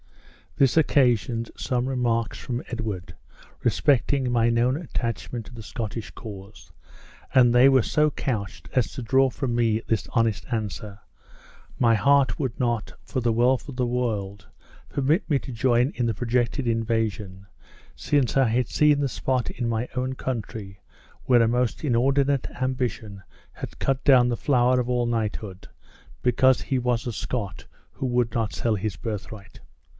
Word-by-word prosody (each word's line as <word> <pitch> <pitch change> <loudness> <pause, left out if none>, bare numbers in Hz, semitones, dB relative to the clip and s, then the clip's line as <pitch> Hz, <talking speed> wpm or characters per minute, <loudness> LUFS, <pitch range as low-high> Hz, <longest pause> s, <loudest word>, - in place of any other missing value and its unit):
This 135 +1 +3
occasioned 120 -6 +2
some 125 -1 -1
remarks 120 -4 0
from 120 -1 -4
Edward 110 -7 -5 0.5
respecting 135 -1 +2
my 120 -1 +3
known 120 +2 +2
attachment 120 -6 -4
to - - -13
the 115 - -9
Scottish 115 -2 -5
cause, 100 -1 -11 0.6
and 120 -2 +5
they 125 +2 +7
were 130 -3 +4
so 150 0 +2
couched 105 -10 -4
as 125 -3 +1
to - - -6
draw 135 +3 +3
from 125 -1 -3
me 115 -2 +2
this 110 - 0
honest 115 -3 +1
answer; 105 -2 -4 0.8
my 115 -1 +4
heart 140 +3 +3
would 130 -5 -3
not, 120 -4 -1
for 130 - -3
the 120 0 +1
wealth 125 +5 +2
of 135 - -7
the 125 -1 0
world, 105 -5 -2 0.4
permit 145 +7 +1
me 145 - +3
to 135 - -8
join 120 +2 +2
in 120 -2 0
the 115 - -1
projected 120 +3 0
invasion, 110 -4 -1 0.5
since 140 -5 0
I 135 -2 +4
had 120 +3 +1
seen 150 -1 +3
the 140 - +1
spot 130 -1 -1
in 120 - -3
my 115 +2 -1
own 130 +1 -1
country 110 -6 -5 0.5
where 125 -2 +5
a - - +3
most 125 +2 0
inordinate 135 +1 +2
ambition 125 -6 -2 0.3
had - - -8
cut 135 -1 0
down 125 -3 +6
the 120 - -1
flower 125 -2 +3
of 125 0 -2
all 125 -1 +1
knighthood, 110 -4 -3 0.6
because 130 +1 +4
he 130 - -1
was 120 -2 0
a 120 - -3
Scot 100 +1 -4 0.3
who 135 - -4
would 120 -2 0
not 115 -2 -1
sell 115 -2 0
his 105 -1 -3
birthright! 100 0 -7
120 Hz, 160 wpm, -25 LUFS, 110-130 Hz, 0.8 s, they